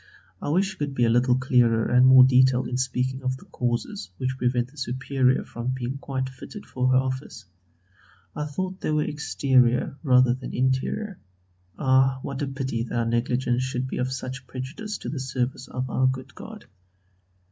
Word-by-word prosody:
I - - -3
wish 190 +6 +2
you 190 - -12
could 145 -2 -3
be 120 - +2
a 115 - +3
little 125 +1 +3
clearer 125 -3 +3
and 125 +1 +5
more 130 0 +9
detailed 130 0 +4
in 125 - -2
speaking 130 +1 -1
of 130 0 -2
the - - -16
causes 125 - -3
which 130 0 -2
prevent 125 -1 0
the 150 - -21
Superior 130 0 0
from 120 +2 -4
being 130 +2 -4
quite 130 -2 -3
fitted 135 +10 -10
for 125 0 -1
her 130 - +4
office; 130 -4 -3 0.9
I 150 - -2
thought 185 +5 -4
they - - -2
were 150 0 +2
exterior 130 -3 +1
rather 125 -4 +4
than 130 0 -7
interior. 130 - -1 0.6
Ah! 130 -1 +3
what 140 0 -5
a 145 - -1
pity 135 -4 -3
that 120 0 -3
our 115 - +1
negligence 120 +1 0
should 130 0 -2
be - - -5
of 130 +1 -1
such 130 0 -6
prejudice 145 - -6
to - - -6
the 145 - -4
service 130 0 -3
of 130 0 -4
our 130 0 +2
good 130 +1 -3
God. 220 -1 -10
130 Hz, 185 wpm, -25 LUFS, 125-135 Hz, 0.9 s, more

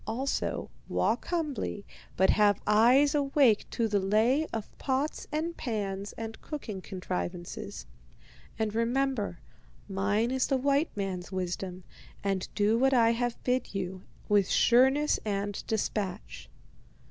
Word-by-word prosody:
Also, 255 +5 -2 0.2
walk - - 0
humbly, 295 - -2 0.3
but 190 - +5
have 205 -1 +4
eyes 245 +8 +5
awake 275 -6 +3
to 230 -2 0
the 205 -2 +1
lay 225 +10 +2
of 220 -2 -6
pots 275 +3 -1
and 325 +3 -2
pans 200 -4 -3
and 225 0 -7
cooking 220 -11 -6
contrivances. 180 - -5 0.7
And 220 -2 -1
remember, 230 -4 0 0.5
mine 205 +4 0
is 260 -1 +1
the 270 - +2
white 280 +4 +2
man's 190 -2 -3
wisdom, 185 0 -4 0.4
and 195 -2 -1
do 215 +2 +3
what 270 +1 +4
I 230 -2 +5
have 240 0 -1
bid 250 -4 -1
you, 185 -1 -3 0.3
with 205 -2 +3
sureness 265 +5 +4
and 205 -1 -2
despatch.' 205 -3 -3
220 Hz, 125 wpm, -29 LUFS, 195-265 Hz, 0.7 s, but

